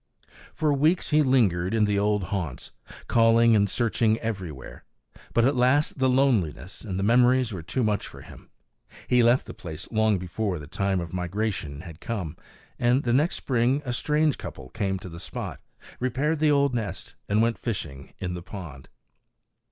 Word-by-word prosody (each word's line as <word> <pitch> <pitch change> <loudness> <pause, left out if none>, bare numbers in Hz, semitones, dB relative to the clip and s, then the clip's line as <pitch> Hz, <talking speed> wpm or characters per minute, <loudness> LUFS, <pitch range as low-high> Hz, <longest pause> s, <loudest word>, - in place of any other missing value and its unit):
For 155 -2 +1
weeks 155 +6 +2
he 155 +1 +5
lingered 110 - +2
in 110 - +3
the 105 -1 +1
old 105 -1 +1
haunts, 90 -8 -4 0.4
calling 115 0 +5
and 100 -1 +3
searching 115 0 +1
everywhere; 95 - -6 0.5
but 115 - +3
at 135 +2 +2
last 130 +4 +2
the 130 0 +3
loneliness 115 - +1
and 95 -5 -5
the 95 - -1
memories 125 +1 +4
were 90 - -5
too 120 +10 -2
much 105 -2 0
for - - -12
him. - - -14 0.6
He 125 -1 +4
left 120 +2 +4
the - - -8
place 80 -1 -8
long 110 -2 +2
before 90 +2 -3
the 75 - -8
time 95 +4 -1
of 85 0 -7
migration 95 -4 -3
had 85 -3 -11
come; 90 -9 -4 0.4
and 125 +3 +3
the 120 - +1
next 150 +7 +2
spring 130 +3 +1
a 125 - -2
strange 150 +3 +1
couple 65 -1 -8
came 95 +5 -2
to 95 - -9
the 85 -1 -9
spot, - - -6 0.4
repaired 135 +5 0
the 155 0 +3
old 140 -2 +3
nest, 105 -6 -4 0.2
and 105 +1 +2
went 115 0 0
fishing 75 - -5
in 90 -1 -4
the 90 - -5
pond. 85 -8 -9
110 Hz, 175 wpm, -26 LUFS, 90-125 Hz, 0.6 s, he